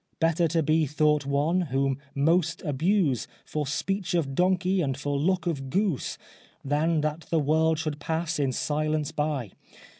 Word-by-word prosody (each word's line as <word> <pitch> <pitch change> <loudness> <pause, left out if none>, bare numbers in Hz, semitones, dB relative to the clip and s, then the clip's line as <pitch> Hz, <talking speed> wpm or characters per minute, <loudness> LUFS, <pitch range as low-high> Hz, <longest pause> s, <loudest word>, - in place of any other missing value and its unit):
Better 165 0 +2
to 165 0 +1
be 155 +1 +2
thought 150 0 +2
one, 150 +6 +1
whom 135 -3 0 0.2
most 165 +3 +2
abuse 155 - +1 0.2
For 150 -2 -3
speech 185 +4 -1
of 145 -5 0
donkey 185 +3 +2
and 135 -4 -1
for 145 0 -2
look 180 +6 +1
of 140 -6 -2
goose, 190 -2 0 0.5
Than 155 +3 +1
that 155 +2 -3
the 165 - +1
world 160 +2 +2
should 155 -2 -3
pass 160 +1 -2
in 135 -2 +1
silence 155 +3 -1
by. 150 -8 -2
155 Hz, 155 wpm, -27 LUFS, 145-170 Hz, 0.5 s, Better